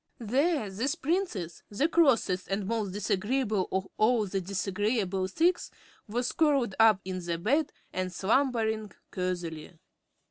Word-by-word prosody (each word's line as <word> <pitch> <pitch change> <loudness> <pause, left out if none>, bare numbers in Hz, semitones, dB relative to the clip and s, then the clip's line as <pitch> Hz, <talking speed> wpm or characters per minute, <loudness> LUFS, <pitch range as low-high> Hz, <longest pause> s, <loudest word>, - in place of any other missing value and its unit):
There 270 +3 +1
this 235 +8 -1
Princess, 275 - -2
the 215 +9 +1
crossest 240 - +2
and 195 0 -2
most 215 -2 -1
disagreeable 205 +1 0
of 190 0 -1
all 220 0 +3
the 195 0 -2
disagreeable 195 +1 -1
six, 340 - +1 0.4
was 240 +4 -1
curled 280 - +2
up 220 -4 +6
in 185 -1 -3 0.2
bed 285 +7 +2 0.2
and 185 0 -2
slumbering 220 0 0 0.2
cosily. 175 -3 -4
210 Hz, 120 wpm, -29 LUFS, 190-260 Hz, 0.4 s, up